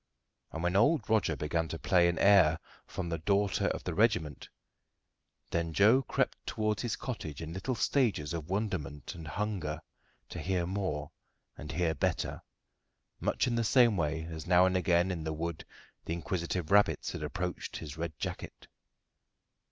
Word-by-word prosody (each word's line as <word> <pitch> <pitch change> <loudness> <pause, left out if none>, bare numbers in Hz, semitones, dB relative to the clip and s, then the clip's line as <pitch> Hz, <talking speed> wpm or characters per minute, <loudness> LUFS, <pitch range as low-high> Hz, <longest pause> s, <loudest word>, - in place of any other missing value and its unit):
And 80 - -5
when 90 +1 +1
old 145 +10 +3
Roger 110 -7 +2
began 80 +3 -1
to 80 - -5
play 90 0 +3
an 85 -1 0
air 95 -6 +6 0.3
from 90 - -4
the 85 -1 -2
Daughter 100 +4 +1
of - - -2
the - - -3
Regiment, 90 - +1 1.0
then 85 -1 -1
Joe 110 +9 +5
crept - - -1
towards 110 -2 -1
his 120 -2 -1
cottage 80 - -5
in 80 0 -6
little 120 +8 -2
stages 110 - +1
of 80 -2 -5
wonderment 90 - -3
and 80 -3 -9
hunger 90 -4 -3 0.5
to - - -6
hear 90 -2 0
more 90 -6 -3 0.4
and 75 0 -7
hear 85 -2 +1
better, 70 - -1 0.8
much - - +1
in 125 - 0
the 115 0 +1
same 120 -1 +5
way 80 -2 -1
as 80 -1 -7
now 90 0 +6
and 95 0 +1
again 90 0 +2
in 85 -3 -4
the 80 0 -2
wood 85 +1 -4 0.4
the 85 - -2
inquisitive 85 0 -3
rabbits 105 0 +3
had - - -6
approached 90 0 -4
his 75 -3 -7
red 80 -2 -5
jacket. - - -6
90 Hz, 165 wpm, -31 LUFS, 80-100 Hz, 1.0 s, air